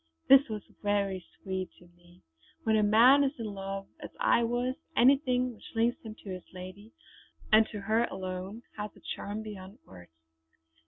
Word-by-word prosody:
This 270 0 +7
was 210 -2 -4 0.2
very 200 -3 0 0.2
sweet 190 -1 -3
to 175 - -18
me. 175 0 -22 0.4
When 220 -1 +2
a 215 - +4
man 235 +7 +6
is 275 0 0
in 230 - -5
love, 195 0 -5
as - - -8
I - - +4
was, 245 +2 0 0.2
anything 255 -1 +4
which 225 - -15
links 230 +2 +1
him 220 -1 -9
to 200 - -9
his 185 -1 -9
lady, 185 +4 -10 0.6
and 220 +1 +6
to 210 - -7
her 220 +4 +2
alone, 190 +4 -6
has 210 0 -4
a - - -16
charm 210 +2 -5
beyond 200 -1 -9
words. 90 -2 -14
210 Hz, 170 wpm, -30 LUFS, 190-235 Hz, 0.6 s, This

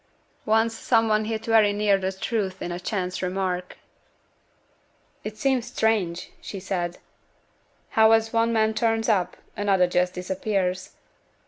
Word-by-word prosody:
Once 225 +1 +2
some 225 -1 +2
one 215 0 +2
hit 220 0 -3
very 220 -2 +4
near 205 0 +2
the 190 -1 -1
truth 190 -1 -3
in 175 - -4
a 175 - -4
chance 185 -1 -3
remark. 180 -1 -2 1.5
'It 215 0 -6
seems 255 0 +1
strange,' 205 -8 0
she 195 - -7
said, 175 -2 -3 0.9
'how 220 0 +5
as 225 0 +3
one 230 0 +2
man 220 -1 +2
turns 225 -1 +1
up, 200 -6 +1 0.2
another 195 -3 +3
just 180 +1 0
disappears. 185 0 -2
205 Hz, 135 wpm, -25 LUFS, 185-225 Hz, 1.5 s, how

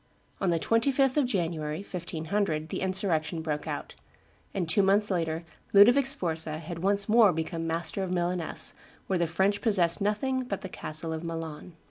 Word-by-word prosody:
On 190 - +1
the 170 - +2
25th 260 - +2
of 290 -4 +2
January, 165 -6 -2
1500, 170 -2 -3
the - - -3
insurrection 180 -4 0
broke 150 -2 -3
out; - - -5 0.6
and 185 -4 -2
two 165 +5 +3
months 200 +2 +3
later 165 -2 -1 0.3
Ludovic 245 +7 +7
Sforza 160 - -1
had 165 +1 -7
once 200 +2 +2
more 220 -2 +6
become 165 +1 -3
master 165 +3 -2
of 190 - -2
Milaness, 175 -1 -1 0.3
where 185 -2 0
the 170 - +1
French 190 +5 +1
possessed 190 -5 +3
nothing 255 +6 0
but 205 -6 -4
the 190 - -6
castle 160 -1 -3
of 160 +1 -5
Milan. 165 0 -6
180 Hz, 165 wpm, -28 LUFS, 160-205 Hz, 0.6 s, Ludovic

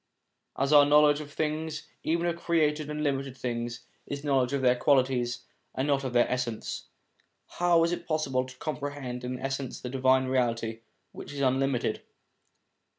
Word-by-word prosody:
As 135 +2 +1
our 145 -1 +9
knowledge 145 0 +5
of 145 -1 -9
things, 155 0 -3
even 170 +2 0
of 170 -1 0
created 155 -3 +1
and 150 0 -3
limited 135 -2 -1
things, 120 -1 -3 0.3
is 140 0 -5
knowledge 135 -3 +2
of 140 -1 -1
their 125 -1 +5
qualities 125 -2 +1 0.3
and 130 +2 -1
not 140 -1 +1
of 130 - -3
their 120 0 +4
essence, 120 -3 -3 0.7
how 175 -1 +4
is 170 - +1
it 175 - -4
possible 140 -5 0
to 130 -1 -12
comprehend 140 -3 -5
in 125 +1 -3
its 125 - -5
essence 135 -1 -3
the 125 - -6
Divine 130 0 +3
Reality, 115 -3 0 0.3
which - - -9
is 140 - -4
unlimited? 135 -1 +1
135 Hz, 165 wpm, -28 LUFS, 125-150 Hz, 0.7 s, our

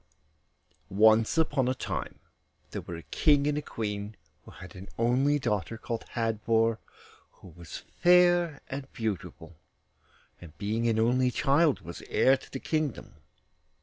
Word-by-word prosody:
Once 110 - +4
upon 145 -5 +2
a 130 - 0
time - - -5 0.5
there - - -4
were 85 - -7
a 80 - -9
King 145 -2 +2
and 150 0 +1
a 150 - -1
Queen 105 -4 -5 0.3
who - - -14
had 90 0 -12
an 95 +1 -10
only 130 +5 +2
daughter, 110 -4 -2
called 115 0 -5
Hadvor, 115 0 +1 0.5
who 95 - -15
was 85 -1 -10 0.2
fair 175 -3 +4
and 135 0 -7
beautiful, 90 -7 -5 0.8
and 80 -3 -14
being 110 +4 -1
an 115 -1 +1
only 125 +3 +2
child, 140 +4 +2
was 85 +1 -9
heir 135 - +4
to 135 - -12
the 135 - -5
kingdom. 155 -4 -3
115 Hz, 145 wpm, -28 LUFS, 105-140 Hz, 0.8 s, Once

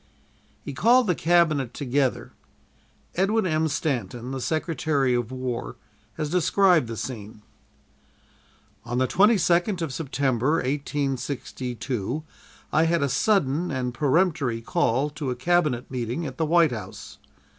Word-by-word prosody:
He 140 - -6
called 240 - +4
the 180 - +2
Cabinet 160 -7 +2
together. 135 -1 -1 0.8
Edwin 200 +4 +1
M. 160 -2 +1
Stanton, 125 -5 -3
the 135 -1 -4
Secretary 155 -3 0
of 120 -1 -1
War, 130 -2 -4 0.4
has 155 -2 -4
described 180 - +3
the 115 -1 -6
scene: 105 -4 -7 1.4
"On 120 0 -3
the 130 - +3
22nd 185 - +3
of 150 -5 -4
September, 135 -2 0
1862, 135 -3 -3 0.5
I 160 +2 +4
had 165 -2 +1
a 140 - +1
sudden 160 +1 +1
and 125 -2 -2
peremptory 145 -4 +1
call 130 +6 +1
to 145 -2 -4
a 125 - -2
Cabinet 150 -3 0
meeting 125 +5 -3
at 130 -3 -6
the 160 - +1
White 165 -2 +4
House. 115 -3 -8
140 Hz, 125 wpm, -25 LUFS, 125-165 Hz, 1.4 s, called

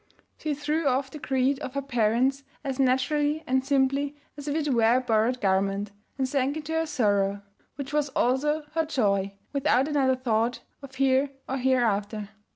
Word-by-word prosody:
She 305 -2 -2
threw 300 +2 -1
off 265 0 0
the 300 - -8
creed 265 0 +1
of 255 - -6
her 280 - 0
parents 250 +2 +1 0.2
as 270 -2 -3
naturally 290 +4 +1
and 260 -1 +1
simply 275 +1 +1 0.2
as 290 0 -9
if 290 - -1
it 300 -3 0
were 230 0 +4
a - - +4
borrowed 245 0 +1
garment, 195 0 0 0.3
and 265 -1 0
sank 275 +2 0
into 315 +1 -5
her 325 0 0
sorrow, 205 -7 +1 0.3
which 280 +1 -6
was 295 -1 +1
also 295 +5 +1
her 325 +1 0
joy, 200 -8 0 0.2
without 275 -1 +2
another 275 -4 +2
thought 235 -1 0 0.2
of 270 -1 -11
here 270 +1 +3 0.2
or 265 - -2
hereafter. 215 -5 0
265 Hz, 170 wpm, -26 LUFS, 235-285 Hz, 0.3 s, were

